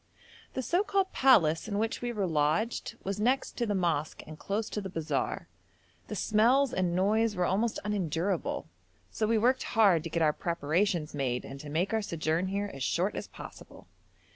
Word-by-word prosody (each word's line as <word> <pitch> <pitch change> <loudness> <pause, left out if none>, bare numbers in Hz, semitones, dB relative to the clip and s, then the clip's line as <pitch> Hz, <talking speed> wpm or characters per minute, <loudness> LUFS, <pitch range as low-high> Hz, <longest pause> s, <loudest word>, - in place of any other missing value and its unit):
The 260 - -2
so 350 +9 +2
called 390 -2 0
palace 175 -11 +4
in 200 -2 -2
which 225 +2 -1
we 240 0 -2
were 210 -4 -1
lodged 165 +9 0
was 195 +1 -3
next 250 +5 +1
to 235 - 0
the 205 - 0
mosque 165 -5 -1
and 155 0 -10
close 210 +2 -2
to 210 - -2
the 190 - -6
bazaar; 165 -3 -2 0.6
the - - -5
smells 240 +5 +3
and 180 -2 0
noise 210 +4 +2
were 180 -1 +1
almost 215 +5 0
unendurable, 185 -2 -1 0.4
so 215 - -1
we 225 0 +3
worked 250 +4 +3 0.2
hard 195 -8 +5
to 165 - -5
get 165 0 0
our 150 -1 +3
preparations 170 +1 0
made, 130 -4 -2
and 135 - -8
to 145 - -8
make 175 +8 0
our 220 - +2
sojourn 165 -1 -1
here 200 +1 -2
as 135 - -9
short 180 +9 0
as - - -5
possible. - - -12
195 Hz, 190 wpm, -30 LUFS, 165-220 Hz, 0.6 s, hard